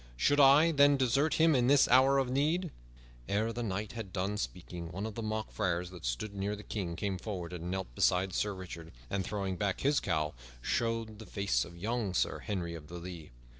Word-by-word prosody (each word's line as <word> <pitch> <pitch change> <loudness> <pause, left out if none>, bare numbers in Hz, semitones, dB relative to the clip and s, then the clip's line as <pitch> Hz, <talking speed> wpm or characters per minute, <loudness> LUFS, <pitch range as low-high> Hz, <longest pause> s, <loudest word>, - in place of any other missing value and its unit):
Should 145 - +3
I, 145 +4 +7
then, 145 -1 +5
desert 135 +4 +2
him 160 0 +5
in 125 -2 +3
his 140 -1 +6
hour 130 +2 +5
of 135 -2 +2
need?" 155 +7 0 0.6
Ere 110 +3 0
the 120 - -4
knight 105 -1 -3
had 110 -5 -7
done 95 +2 -1
speaking, 90 -3 -5
one 95 +3 -4
of 110 - -5
the 115 - -5
mock 110 0 -3
friars 90 -3 -1
that 90 -8 -9
stood - - -2
near 100 +1 -2
the 105 - -10
King 90 -7 -4
came 95 0 -2
forward 90 -5 -5
and 85 0 -5
knelt 95 -9 -4
beside 90 +7 +2
Sir 105 +1 0
Richard, 85 -3 -8 0.2
and 95 - 0
throwing 95 -1 -3
back 100 -1 -1
his 145 +1 +3
cowl 75 -1 -1 0.3
showed 115 - -1
the 110 - -10
face 100 +2 0
of 85 0 -11
young 105 0 -2
Sir - - +1
Henry 90 -4 -3
of 80 -3 -9
the 85 - -9
Lea. 85 -3 -8
100 Hz, 210 wpm, -32 LUFS, 90-120 Hz, 0.6 s, I